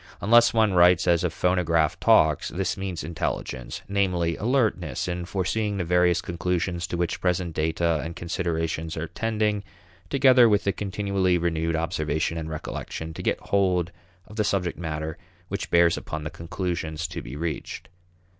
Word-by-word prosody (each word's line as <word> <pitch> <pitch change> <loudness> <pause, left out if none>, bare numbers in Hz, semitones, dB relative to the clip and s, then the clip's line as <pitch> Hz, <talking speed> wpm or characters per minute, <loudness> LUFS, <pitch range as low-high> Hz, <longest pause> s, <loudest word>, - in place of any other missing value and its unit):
Unless 120 +3 +5
one 110 -3 +3
writes 90 -1 +5
as 85 -1 +3
a 90 - +2
phonograph 85 -2 +1
talks, 75 +1 +4
this 95 +1 -2
means 95 -4 -4
intelligence; 80 -5 -4
namely, 90 -4 0
alertness 105 - 0
in 90 0 -3
foreseeing 100 +3 -1
the 95 - -1
various 90 0 +2
conclusions 90 0 -2
to 85 - -3
which 85 -1 -2
present 90 -2 0
data 80 +1 0
and 80 +1 -6
considerations 80 -2 -2
are 80 - -2
tending, 105 -2 -1 0.5
together 130 -2 +6
with 100 -1 +1
continually 100 -2 0
renewed 80 -1 0
observation 80 0 -1
and 80 0 -5
recollection 80 +1 -6
to - - -7
get - - 0
hold 90 -3 +1 0.3
of 105 - -13
the 105 - +2
subject 95 -5 -1
matter 80 -2 -4 0.3
which - - -4
bears 85 -1 +4
upon 75 0 -5
the 75 - -5
conclusions 85 -1 -4
to 85 - -6
be - - -8
reached. 80 +1 -4
85 Hz, 155 wpm, -25 LUFS, 80-95 Hz, 0.5 s, together